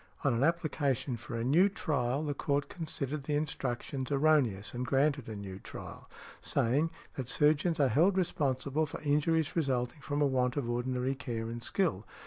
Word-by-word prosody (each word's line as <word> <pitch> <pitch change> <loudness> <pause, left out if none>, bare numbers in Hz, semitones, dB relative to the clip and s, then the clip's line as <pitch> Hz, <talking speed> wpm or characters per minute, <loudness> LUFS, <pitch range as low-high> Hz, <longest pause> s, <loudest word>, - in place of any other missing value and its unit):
On 140 -4 +3
an 115 +3 +1
application 145 -6 0
for 120 +1 -7
a 115 - -1
new 165 +11 +5
trial 140 - -1
the 145 -2 -1
court 140 0 -1
considered 150 -4 -4
the 150 - 0
instructions 135 -2 -2
erroneous 135 -9 +2
and 125 +1 -3
granted 140 -1 +1
a 110 - -5
new 100 -2 -7
trial, - - -9 0.3
saying: 140 +8 +1 0.2
"that 130 -2 -5
surgeons 155 +3 +3
are 140 - +5
held 175 +9 +3
responsible 150 -3 0
for - - -6
injuries 150 +2 +1
resulting 135 -3 0
from 145 +1 -2
a 145 - +4
want 130 -1 +1
of 135 -5 -1
ordinary 125 +2 -1
care 120 -4 -4
and 120 +1 -5
skill. 110 - 0
140 Hz, 170 wpm, -31 LUFS, 125-150 Hz, 0.3 s, new